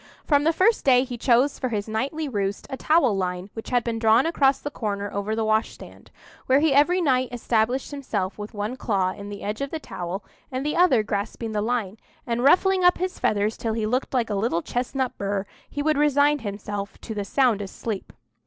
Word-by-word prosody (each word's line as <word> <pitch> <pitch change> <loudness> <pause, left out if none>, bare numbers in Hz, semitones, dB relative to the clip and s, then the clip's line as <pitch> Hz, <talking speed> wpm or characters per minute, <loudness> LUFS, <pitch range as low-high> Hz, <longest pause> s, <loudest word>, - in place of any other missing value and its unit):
From 290 -1 +3
the 325 - +5
first 385 +7 +2
day 255 -2 +5
he 255 -2 -6
chose 245 +4 +2
for 255 - -1
his 210 -2 -2
nightly 275 +8 -2
roost 200 -5 -2
a - - -2
towel 275 -6 +3
line 180 +1 -3
which 225 - -7
had 245 -2 +2
been 230 -1 -2
drawn 225 +3 +4
across 275 -5 +3
the 290 - -6
corner 205 -5 -3
over 200 +2 -2
the 225 0 -1
wash 215 +1 +1
stand, - - -14 0.4
where 265 +2 +5
he 305 -1 +3
every 295 +7 +4
night 255 -5 +2
established 240 +2 0
himself 215 -9 -3
with 210 +1 -7
one 210 +5 -3
claw 195 -6 0
in 200 +2 -8
the 205 -1 -8
edge 210 +5 -3
of 275 - -2
the 320 - -4
towel 180 - -5 0.3
and 260 +2 -3
the 300 - -1
other 320 -11 +4
clasping 215 +2 -3
the 210 -1 -1
line, 220 -3 -2 0.3
and, 240 0 -1
ruffling 370 +6 +4
up 355 0 +5
his 370 +1 -3
feathers 210 +1 +1
till 225 -1 -2
he 220 -1 -1
looked 250 +5 -1
like 240 -4 0
a - - 0
little 195 -4 0
chestnut 255 +1 -2
burr, 200 0 -1 0.2
he 290 - -3
would 305 -1 +2
resign 290 0 +3
himself 205 -2 -5
to 225 - -6
the 205 -1 -3
soundest 205 -3 0
sleep. 215 -4 -4
235 Hz, 215 wpm, -24 LUFS, 205-275 Hz, 0.4 s, the